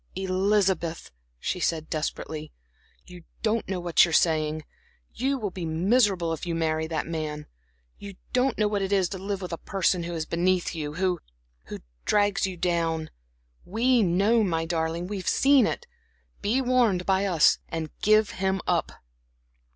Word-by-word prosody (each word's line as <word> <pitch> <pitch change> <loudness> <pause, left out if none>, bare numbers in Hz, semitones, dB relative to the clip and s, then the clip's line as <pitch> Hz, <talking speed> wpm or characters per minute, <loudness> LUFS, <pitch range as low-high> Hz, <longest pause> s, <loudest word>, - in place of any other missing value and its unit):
"Elizabeth," 190 -2 0 0.3
she 180 - -2
said, 160 -2 -1
desperately, 155 0 -4 0.5
"you 180 -1 -12 0.2
don't 225 -1 0
know 190 -2 -2
what 175 -1 +4
you're 170 - +1
saying. 155 -1 +2 0.5
You 270 +2 0
will 210 -6 -3
be 180 -1 -6
miserable 175 +1 +2
if 160 - -6
you 170 -2 -2
marry 160 -1 0
that 160 -1 -2
man. 155 -2 -4 0.5
You 200 -1 -9 0.2
don't 255 0 +2
know 210 - +2
what 205 -1 -1
it 195 0 -2
is 190 -3 +2
to 190 - -6
live 195 0 -4
with 180 - -5
a 165 - -4
person 190 -2 0
who 170 0 -4
is 160 -1 -2
beneath 180 +2 0
you, 150 -2 -5
who 180 -1 0 0.5
who - - -8 0.2
drags 205 -2 +2
you 185 -2 -6
down. 165 -2 -1 0.5
We 235 +5 +2
know, 200 +5 +3
my 165 -4 0
darling, 165 +1 -2
we 205 +2 -4
have 185 - -7
seen 275 -4 +4
it. - - -4 0.6
Be 250 +6 +1
warned 240 -8 +2
by 190 0 +2
us, 175 -6 +4
and 160 -2 -4
give 215 0 +4
him 190 0 -1
up." - - 0
180 Hz, 165 wpm, -26 LUFS, 165-205 Hz, 0.6 s, what